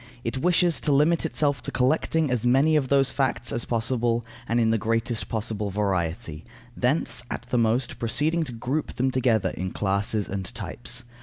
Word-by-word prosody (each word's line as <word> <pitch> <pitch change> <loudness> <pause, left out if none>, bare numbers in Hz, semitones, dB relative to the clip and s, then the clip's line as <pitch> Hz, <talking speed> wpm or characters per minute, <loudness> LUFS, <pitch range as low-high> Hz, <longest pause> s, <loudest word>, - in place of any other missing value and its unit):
It 115 +3 -2
wishes 175 +1 +3
to 150 - +1
limit 155 +4 +3
itself 145 -5 0
to - - -4
collecting 150 +3 +1
as 125 -3 0
many 135 +6 +4
of 145 -3 +2
those 135 0 +3
facts 130 -4 0
as 115 - 0
possible, 115 0 0 0.2
and 115 +1 +2
in 110 -1 +3
the 115 - +1
greatest 115 +1 -1
possible 105 -2 -2
variety, 85 -6 -2 0.3
thence, 125 -2 +1
at - - -4
the 125 - +2
most, 115 +2 0
proceeding 155 +8 0
to 130 - -7
group 125 +6 -3
them 130 +1 +1
together 125 -5 +1
in 95 +1 -4
classes 100 +2 -1
and 95 -1 -4
types. 120 +4 -2
120 Hz, 175 wpm, -25 LUFS, 110-135 Hz, 0.3 s, many